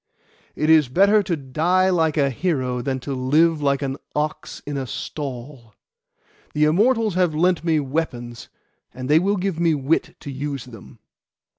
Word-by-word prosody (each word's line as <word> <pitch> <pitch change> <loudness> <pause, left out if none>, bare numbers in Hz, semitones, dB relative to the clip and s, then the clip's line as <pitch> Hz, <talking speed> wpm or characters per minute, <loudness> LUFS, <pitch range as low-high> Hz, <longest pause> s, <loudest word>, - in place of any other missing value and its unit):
'It 155 - -1
is 155 -4 +5
better 200 +9 +4
to 185 -4 -2
die 170 +8 +1
like 160 -4 +1
a 140 -2 +2
hero 130 -5 -1
than 130 +1 -2
to 140 +2 -5
live 150 +5 +2
like 140 0 +1
an 135 0 -3 0.2
ox 150 +1 -3
in 145 - -4
a 135 -2 -3
stall. 130 -4 -7 0.8
The 150 - +2
Immortals 215 +7 +3
have 175 -3 +1
lent 175 +1 +2
me 160 -2 +2
weapons, 130 -5 -4 0.5
and 130 0 -6
they 150 +3 +5
will 200 +4 0
give 185 -3 -2
me 165 -2 +2
wit 160 +5 -1
to 140 - -7
use 140 -1 -5
them. 110 - -13
150 Hz, 165 wpm, -22 LUFS, 135-170 Hz, 0.8 s, is